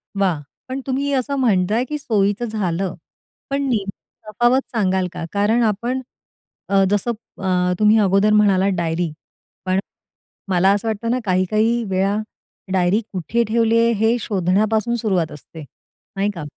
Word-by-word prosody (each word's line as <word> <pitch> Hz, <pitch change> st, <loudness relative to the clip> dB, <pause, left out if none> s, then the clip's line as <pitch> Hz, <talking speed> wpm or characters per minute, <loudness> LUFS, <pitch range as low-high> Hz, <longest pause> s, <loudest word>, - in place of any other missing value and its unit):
वाह! 185 Hz, -6 st, +1 dB, 0.3 s
पण 260 Hz, +1 st, -3 dB
तुम्ही 280 Hz, +2 st, -1 dB
असं 275 Hz, +1 st, 0 dB
म्हणताय 215 Hz, -1 st, +2 dB
की 300 Hz, -, -2 dB
सोयीचं 210 Hz, -3 st, 0 dB
झालं. 195 Hz, -5 st, -2 dB, 0.5 s
पण 275 Hz, +1 st, -1 dB
नेमकी 215 Hz, -1 st, -5 dB
तफावत 240 Hz, +5 st, +3 dB
सांगाल 190 Hz, -3 st, +1 dB
का? -, -, -5 dB
कारण 210 Hz, +4 st, +2 dB
आपण 235 Hz, +5 st, -1 dB, 0.7 s
अ, 195 Hz, 0 st, +4 dB
जसं 205 Hz, +4 st, +1 dB, 0.3 s
अ, 180 Hz, -1 st, +1 dB
तुम्ही 215 Hz, +1 st, +5 dB
अगोदर 195 Hz, +1 st, +3 dB
म्हणालात 200 Hz, -2 st, +4 dB
डायरी. 170 Hz, -1 st, -1 dB, 0.5 s
पण 185 Hz, +1 st, +1 dB, 0.7 s
मला 185 Hz, +1 st, +3 dB
असं 210 Hz, +3 st, -2 dB
वाटत 220 Hz, +1 st, -3 dB
ना, 255 Hz, -, +1 dB
काही-काही 215 Hz, +5 st, +1 dB
वेळा 195 Hz, +2 st, +1 dB, 0.6 s
डायरी 185 Hz, +4 st, +2 dB
कुठे 205 Hz, +6 st, 0 dB
ठेवली 230 Hz, 0 st, +2 dB
आहे, 230 Hz, 0 st, +3 dB
हे 225 Hz, +2 st, +2 dB
शोधण्यापासून 215 Hz, +3 st, +1 dB
सुरुवात 190 Hz, -8 st, 0 dB
असते, 155 Hz, +2 st, -11 dB, 0.6 s
नाही 200 Hz, +1 st, +1 dB
का? 160 Hz, -, -6 dB
205 Hz, 140 wpm, -20 LUFS, 185-230 Hz, 0.7 s, तुम्ही